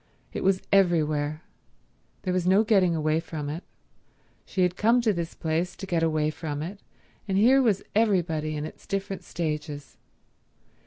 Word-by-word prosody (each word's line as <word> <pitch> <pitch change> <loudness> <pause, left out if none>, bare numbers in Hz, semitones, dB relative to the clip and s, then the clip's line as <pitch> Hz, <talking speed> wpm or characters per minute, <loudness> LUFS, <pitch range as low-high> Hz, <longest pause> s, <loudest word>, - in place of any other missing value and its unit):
It - - -3
was 190 0 +2
everywhere. 155 -5 +2 0.8
There 185 - -1
was 180 -1 0
no 195 +4 +5
getting 190 -6 +3
away 155 0 +1
from 155 -3 -5
it. 165 +4 -6 0.8
She 185 - 0
had 180 0 +1
come 230 +5 +4
to 220 -3 +2
this 170 -2 -4
place 165 +2 -1
to 195 - -7
get 175 -3 0
away 155 -1 +1
from 150 -2 -4
it, 195 +5 -7 0.5
and 190 -1 0
here 255 +6 +6
was 215 -6 +2
everybody 170 -8 +1
in 150 - -3
its - - -11
different 195 -2 -3
stages. 150 -4 -4
175 Hz, 160 wpm, -26 LUFS, 155-195 Hz, 0.8 s, here